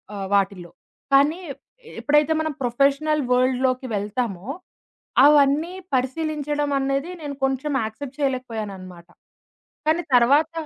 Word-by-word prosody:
ఆహ్, 195 -1 -4
వాటిల్లో. 195 -3 0 0.4
కానీ 290 +6 +4 0.6
ఎప్పుడైతే 295 +2 +3
మనం 315 -1 -2
ప్రొఫెషనల్ 280 +5 +1
వరల్డ్ 255 0 +2
లోకి 255 0 0
వెళ్తామో, 205 -1 -3 0.8
అవన్నీ 295 +3 +4 0.2
పరిశీలించడమనేది 285 +1 -1
నేను 285 -2 -5
కొంచెం 270 +2 0
యాక్సెప్ట్ 255 +6 -7
చేయలేకపోయానన్నమాట. 215 -10 -4 0.8
కానీ 320 +2 +3
తర్వాత 285 +6 +4
275 Hz, 95 wpm, -23 LUFS, 235-295 Hz, 0.8 s, కానీ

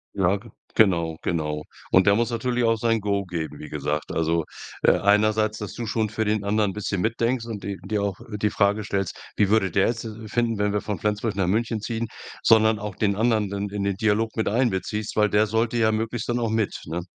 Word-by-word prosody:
Ja, 95 0 +3
ge 115 +2 -14 0.2
genau, 85 -6 +3
genau. 75 -3 -2 0.3
Und 95 +1 +5
der 100 - +6
muss 120 +1 +1
natürlich 120 +1 0
auch 115 0 +3
sein 115 0 +1
Go 100 -1 0
geben, 85 -3 -5
wie 75 - -8
gesagt. 75 +1 -3
Also, 80 0 +1 0.4
äh, - - +7
einerseits, 110 +1 +3
dass 105 -2 -6
du 120 - -5
schon 110 -1 0
für 110 +1 -2
den 105 -1 0
anderen 105 -1 +1
bisschen 100 -2 -2
mitdenkst 115 +3 0
und 110 -4 -6
d 100 -1 -4
dir 105 +1 -1
auch 100 -2 -2 0.2
die 105 - +3
Frage 105 +1 +1
stellst: 95 -2 -2 0.2
„Wie 100 -2 +3
würde 100 -5 +3
der 100 +2 +3
jetzt 115 -1 -2
de 110 0 -8
finden, 115 0 0
wenn 105 0 +1
wir 105 - 0
von 105 -5 -4
Flensburg 105 +1 -1
nach 95 -3 +1
München 110 +3 0
ziehen?“, 115 +1 -3 0.4
sondern 110 -1 +5
auch 105 -2 -5
den 100 -1 +1
anderen 110 -2 +2
dann 100 0 -3
in 100 0 -3
den 100 -1 0
Dialog 110 +2 +1
mit 110 - 0
einbeziehst, 105 -2 -1
weil 105 0 +3
der 105 +2 +4
sollte 115 +2 0
ja 110 -1 +3
möglichst 115 +1 -2
dann 120 0 +1
auch 115 -2 0
mit, 110 -2 0
ne? 85 +2 -3
105 Hz, 225 wpm, -24 LUFS, 100-110 Hz, 0.4 s, äh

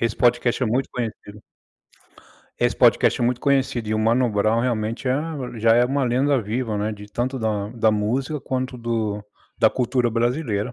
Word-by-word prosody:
esse 115 -1 -1
podcast 120 +1 +2
é - - +2
muito 125 +5 0
conhecido. 110 -3 -6 1.2
Esse - - +1
podcast - - +4
é - - +2
muito 125 0 0
conhecido, 135 -5 0
e 110 - 0
o - - 0
Mano 115 +3 +2
Brown, 110 +2 +1
realmente, 115 0 -2
é 130 - +2 0.4
já 115 +1 +3
é 120 +1 +5
uma 135 +2 0
lenda 130 +3 +2
viva, 110 0 -2
né, 105 +1 -1
de 105 0 -10
tanto 125 +5 -2
da 105 -4 -2
da 115 -2 +2
música 125 +8 -1
quanto 130 -1 -3
do 110 -3 -2 0.3
da 115 -2 +5
cultura 125 +1 0
brasileira. 120 -1 -1
120 Hz, 180 wpm, -22 LUFS, 110-125 Hz, 1.2 s, é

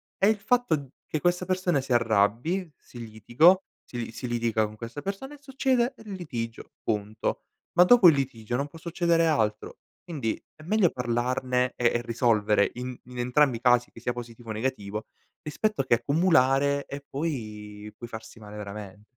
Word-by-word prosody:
è 195 - +3
il 215 0 +3
fatto 240 -2 +2
d 140 -2 -7 0.2
che 155 - -2
questa 175 +2 +1
persona 185 -5 +1
si 130 - -8
arrabbi, 120 - +2
si 120 - -14
litigo 130 - +4 0.3
si 120 - -7
li - - -9
si 125 - -6
litiga 115 -2 +1
con 105 - -12
questa 115 +6 -7
persona 200 - -5
e 295 - -13
succede 265 -2 0
il 210 - -8
litigio 120 -12 -6
punto. 105 -1 -2 0.3
Ma 175 - +7
dopo 230 -2 +7
il 165 - +8
litigio 120 -4 -3
non 140 +3 -1
può 155 - -13
succedere 170 0 +1
altro. 110 -10 0 0.2
Quindi 140 -10 -3 0.2
è - - -16
meglio 195 +1 +3
parlarne 125 +1 0
e 120 -1 +2
e 120 - +1
risolvere 110 -3 +2
in 125 +1 -5
in 125 0 -11
entrambi 125 +1 +3
i - - -15
casi, 125 -1 +4
che - - -13
sia 120 +1 -2
positivo 120 -1 -9
o - - -1
negativo, 105 -3 -3 0.3
rispetto 205 +6 -1
che 120 - +4
accumulare 140 0 +3
e 140 0 -7
poi 105 -8 -5
poi 120 - -8
farsi 110 0 -10
male 105 -1 -10
veramen 105 -1 -8
125 Hz, 180 wpm, -27 LUFS, 115-165 Hz, 0.3 s, il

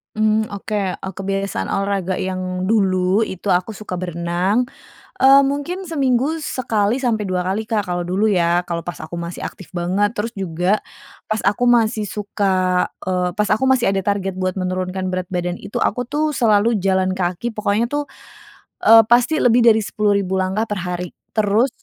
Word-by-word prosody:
Mmm, 215 0 +2
oke, 200 -2 -3
eee, 190 - -7
kebiasaan 195 +1 -3
olahraga 195 -2 -1
yang 185 -1 -3
dulu, 190 -2 +2
itu 200 -3 -2
aku 185 +4 0
suka 185 -4 -6
berenang, 175 +5 0 0.6
eee, 270 +1 +7
mungkin 290 +7 -2
seminggu 285 -2 0
sekali 225 -7 0
sampai 220 -4 0
2 180 -1 -1
kali 200 +4 -2
Kak, 220 -3 0
kalau 175 -1 -3
dulu 205 +4 +1
ya, 175 -1 +2
kalau 170 -1 -3
pas 175 - -5
aku 170 +2 -6
masih 170 +1 -6
aktif 190 - -8
banget. 190 +5 0
Terus 225 +3 -2
juga, 185 +1 0 0.5
pas 215 0 -1
aku 210 +5 +2
masih 225 -3 +2
suka, 190 -3 0 0.2
eee, 180 -1 0
pas 210 0 +1
aku 220 - +2
masih 255 -5 +3
ada 195 - 0
target 195 -1 -1
buat 185 -1 -1
menurunkan 185 0 -2
berat 185 0 -3
badan 175 0 -2
itu, 200 - -5
aku 245 +2 -1
tuh, 300 +3 0
selalu 225 -3 +2
jalan 190 0 +1
kaki, 185 +5 -2
pokoknya 215 +1 0
tuh, 290 0 -2 0.8
eee, 225 -1 +8
pasti 245 +7 +3
lebih 245 -2 +4
dari 220 -1 +6
10.000 200 -3 0
langkah 190 +4 0
per 210 -4 -4
hari. 180 -1 -4 0.2
Terus 215 +4 +2
200 Hz, 170 wpm, -20 LUFS, 185-225 Hz, 0.8 s, eee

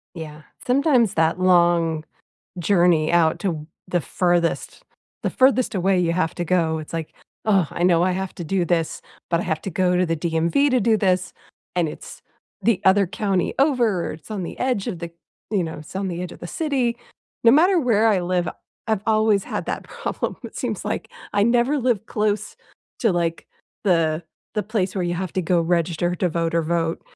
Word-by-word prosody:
Yeah. 155 -2 -8 0.2
Sometimes 250 - +3
that 165 +2 +2
long 170 -3 +3 0.5
journey 175 -3 +3
out 170 -2 +3
to 160 -6 -2 0.2
the 180 -1 +1
furthest 175 +1 0 0.4
the - - +1
furthest 255 -3 +3
away 190 0 +2
you 170 -2 +1
have 165 -2 0
to 175 - -2
go, 165 -2 +1
it's 155 - -9
like, 165 -2 -4 0.3
"Ugh, 195 -6 +3
I - - -3
know 175 -1 +4
I 185 - +2
have 190 0 -3
to 175 - -5
do 180 +2 0
this, 165 -1 -1 0.3
but 170 -1 +2
I - - -2
have 160 -3 -2
to 195 - -4
go 180 +1 +1
to 180 0 +2
the 165 - 0
DMV 170 - +1
to 255 - +3
do 225 +1 +3
this, 185 -3 +1 0.4
and 175 -3 +1
it's - - -10 0.4
the 225 -6 +2
other 195 +1 +5
county 195 0 -1
over. 245 - +2
It's 155 +6 -13
on 200 -4 -3
the - - -7
edge 250 -6 0
of 170 - -4
the 170 -1 -5 0.4
you 200 -5 +1
know, 160 -2 -6
it's 155 +5 -10
on 195 0 -1
the 175 0 -4
edge 180 - -5
of - - -13
the - - -6
city." 255 - -1 0.5
No 230 - +8
matter 350 +6 +5
where 225 -5 +3
I 205 -4 +3
live, 180 0 0 0.4
I've 220 -3 0
always 215 -2 +3
had - - -4
that - - -3
problem. - - -4
It - - -8
seems - - -3
like - - -3 0.2
I 205 - +2
never 240 +5 +2
live 245 -5 0
close 210 -1 -1 0.5
to, 225 -7 +3
like, 170 -1 -1 0.4
the 165 -4 +2 0.3
the 210 - 0
place 195 -2 -2
where 185 -3 -1
you 175 0 -1
have 185 0 -4
to 185 - 0
go 175 +1 +2
register 170 0 0
to 180 - +1
vote 165 0 -1
or 170 - +2
vote. 165 0 -1
180 Hz, 200 wpm, -22 LUFS, 170-215 Hz, 0.5 s, No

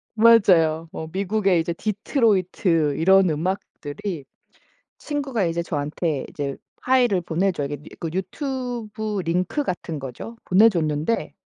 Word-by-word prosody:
맞아요. 180 -8 +5
뭐 160 - -6
미국의 195 -1 +1
이제 170 +1 -2
디트로이트 185 - +1
이런 190 +1 +5
음악들이 170 0 -4 0.7
친구가 275 -8 -2
이제 170 +1 -1
저한테 150 -1 -2
이제 140 -2 -4 0.3
파일을 245 -8 +3
보내줘요. 170 -4 -1
이게 145 - -4 0.2
그 165 - -3
유튜브 220 - -3
링크 180 - 0
같은 165 - -4
거죠. 135 - -8
보내줬는데 180 -2 +2
185 Hz, 280 characters per minute, -23 LUFS, 160-215 Hz, 0.7 s, 맞아요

